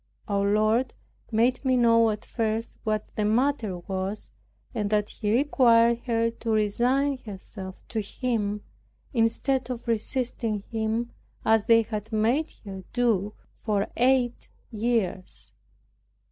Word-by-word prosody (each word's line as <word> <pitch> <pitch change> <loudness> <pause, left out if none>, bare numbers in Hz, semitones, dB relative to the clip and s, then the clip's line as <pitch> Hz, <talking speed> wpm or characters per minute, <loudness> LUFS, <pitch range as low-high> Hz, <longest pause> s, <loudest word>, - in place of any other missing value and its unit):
Our 200 -1 +1
Lord 215 +4 +2 0.4
made 240 +4 +2
me 260 -2 +3
know 230 -1 +5
at 210 -1 -4
first 225 0 -2
what 215 -1 -2
the 210 - 0
matter 225 -3 +1
was; 190 +3 -4 0.4
and 205 -1 -1
that 210 -1 +1
He 210 -2 -2
required 235 -3 +4
her 230 -1 +2
to 230 0 -7
resign 245 +6 +2
herself 195 -3 -9
to 220 - -1
Him, 210 -2 -2 0.5
instead 250 +3 +1
of 240 -2 -5
resisting 230 -2 -1
Him 225 +1 -1 0.3
as 220 -1 +3
they 230 -1 +6
had 215 -1 -5
made 235 +9 +1
her 190 -1 -7
do 215 -5 +1 0.3
for 205 -2 0
eight 250 -1 +2 0.2
years. 215 -5 -2
225 Hz, 125 wpm, -26 LUFS, 210-240 Hz, 0.5 s, they